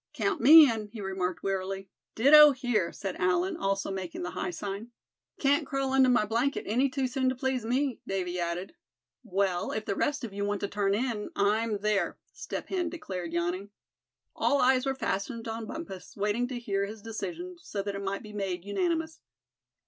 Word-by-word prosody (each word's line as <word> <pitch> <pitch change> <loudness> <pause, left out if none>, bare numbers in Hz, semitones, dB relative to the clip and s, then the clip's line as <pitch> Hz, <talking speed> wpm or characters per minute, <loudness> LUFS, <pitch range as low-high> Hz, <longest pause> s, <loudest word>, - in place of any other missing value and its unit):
"Count 400 -1 0
me 310 +2 +10
in," 220 -3 -2
he 220 +2 -10
remarked, 190 -2 -3
wearily. 195 0 -2 0.3
"Ditto 295 +5 +8
here," 245 -8 0
said 195 -3 -5
Allan, 180 0 +1
also 195 0 -1
making 185 -3 -5
the 180 - -4
high - - -3
sign. 200 +5 -5 0.5
"Can't 285 0 +2
crawl 270 -1 -1
under 265 -1 +5
my 245 -4 +4
blanket 235 +6 0
any 250 +7 +2
too 265 0 -1
soon 260 0 0
to 260 - -1
please 255 -2 -1
me," 260 +1 0
Davy 180 -2 -2
added. 175 - -3 0.5
"Well, 190 -4 0
if 215 - -3
the - - -1
rest 290 +7 -1
of 220 -4 -5
you 200 0 -3
want 205 -1 -1
to 200 - -1
turn 200 -1 0
in, 225 -2 -2
I'm 210 +1 +1
there," 210 -1 0 0.2
Step - - -6
Hen 360 -3 -1
declared, 190 - -5
yawning. 175 +4 -2 0.7
All 285 - +2
eyes 260 +1 +3
were 270 - 0
fastened 230 0 -3
on 225 0 -4
Bumpus, 195 - -8
waiting 210 +4 0
to 255 -1 -5
hear 200 -4 -1
his 215 0 -9
decision, 340 +11 -5
so 200 -1 -4
that 200 0 -3
it 200 - -5
might 195 0 -3
be 210 -1 -10
made 190 -3 -3
unanimous. 320 - -1
215 Hz, 185 wpm, -29 LUFS, 195-265 Hz, 0.7 s, me